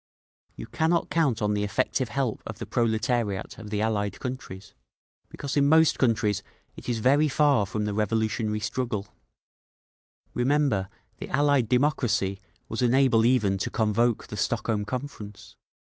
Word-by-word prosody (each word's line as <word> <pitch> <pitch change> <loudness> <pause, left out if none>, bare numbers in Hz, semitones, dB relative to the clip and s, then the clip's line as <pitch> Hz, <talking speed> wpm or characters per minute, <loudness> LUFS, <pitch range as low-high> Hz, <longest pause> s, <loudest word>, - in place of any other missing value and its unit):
"You - - -7
cannot 165 +1 0
count 145 -9 +1
on 105 0 +1
the 105 0 -1
effective 130 +3 -1
help 125 0 -2
of 110 - -7
the - - -6
proletariat 115 -4 -1
of 110 -2 -9
the 105 0 -2
Allied 105 -3 -1
countries, 110 -6 -7 0.6
because 140 -1 -5
in 140 -1 +3
most 160 0 +4
countries 110 -5 +1 0.3
it - - -8
is 120 - 0
very 140 +7 +3
far 140 -7 +2
from 105 +1 -2
the 105 - -2
revolutionary 110 +1 -1
struggle; 110 -2 -3 1.2
remember, 125 -7 +1 0.3
the - - -7
Allied 140 -4 +2
democracy 125 -7 +1 0.3
was 110 - -4
unable 125 -2 +4
even 105 -6 +2
to - - -2
convoke 115 +1 +1
the 105 - -8
Stockholm 110 -1 -1
Conference. 110 -5 -7
115 Hz, 145 wpm, -26 LUFS, 105-130 Hz, 1.2 s, most